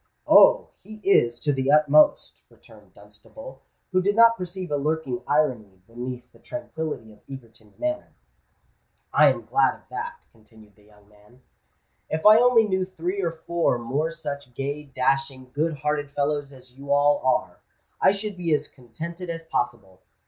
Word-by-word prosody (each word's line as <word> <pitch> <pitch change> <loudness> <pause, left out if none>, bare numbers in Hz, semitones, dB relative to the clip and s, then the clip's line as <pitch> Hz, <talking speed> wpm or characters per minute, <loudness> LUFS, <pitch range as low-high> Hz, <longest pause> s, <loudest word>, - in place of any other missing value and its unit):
"Oh! - - +6
he 215 - -12
is—to 120 -5 +2
the 135 0 -1
utmost," 150 0 +4
returned - - -20
Dunstable, - - -14 0.3
who 185 0 +2
did 200 +2 0
not 230 0 +6
perceive 180 -2 -7
a - - +1
lurking 145 -4 -2
irony 120 -11 -1
beneath 125 +2 -8
the - - -22
tranquillity 160 - -6
of 105 - -21
Egerton's 115 -5 -13
manner. 310 0 -3 1.0
"I - - +6
am - - 0
glad - - +2
of - - -23
that," 315 0 -6
continued 110 -2 -21
the 105 - -25
young 105 -1 -23
man. 105 +5 -23 0.7
"If 160 0 -3
I 215 +1 +8
only 240 -2 +4
knew 190 -2 0
three 185 +1 -4
or 170 -3 -1
four 170 -7 +1
more 135 +7 -2
such 145 -6 -7
gay, 145 +2 -4
dashing, 135 -1 -2
good 155 +2 -1
hearted 145 0 -2
fellows 145 0 -2
as 130 -2 -17
you 140 +2 -8
all 145 0 +3
are, 130 - 0 0.4
I - - +6
should 200 +1 -4
be 170 -4 0
as - - -4
contented 165 +9 -9
as 165 0 -5
possible. 110 - -4
145 Hz, 160 wpm, -24 LUFS, 125-170 Hz, 1.0 s, I